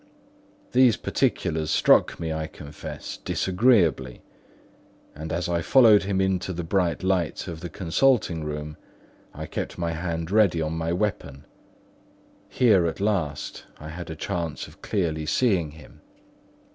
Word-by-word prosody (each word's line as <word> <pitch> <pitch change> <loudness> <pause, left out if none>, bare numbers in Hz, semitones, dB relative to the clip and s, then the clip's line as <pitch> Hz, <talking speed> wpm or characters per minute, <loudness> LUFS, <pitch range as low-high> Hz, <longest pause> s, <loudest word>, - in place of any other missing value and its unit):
These 125 -3 +5
particulars 80 -1 -1
struck - - +3
me, 80 -1 -3
I 80 0 -3
confess, 75 -1 -8
disagreeably; 90 - +1 0.9
and 80 +2 -7
as 85 +2 -1
I 85 -1 0
followed 110 -1 +6
him 95 -1 0
into 95 -1 0
the 85 0 -4
bright 90 0 0
light 95 -3 0
of 80 - -6
the 90 +1 -6
consulting 95 - +1
room, 75 0 -5 0.5
I - - -7
kept - - -5
my 85 -1 -1
hand 85 0 -4
ready 100 -6 +4
on 80 0 -2
my 80 0 -2
weapon. 85 -7 -3 1.0
Here, 100 -9 +4
at 80 - -4
last, 95 -8 -2
I 75 - -9
had 85 +2 -7
a 80 - -5
chance 80 -1 -4
of - - -18
clearly 80 -6 -2
seeing 95 -10 +2
him. 75 -1 -15
85 Hz, 140 wpm, -25 LUFS, 80-95 Hz, 1.0 s, followed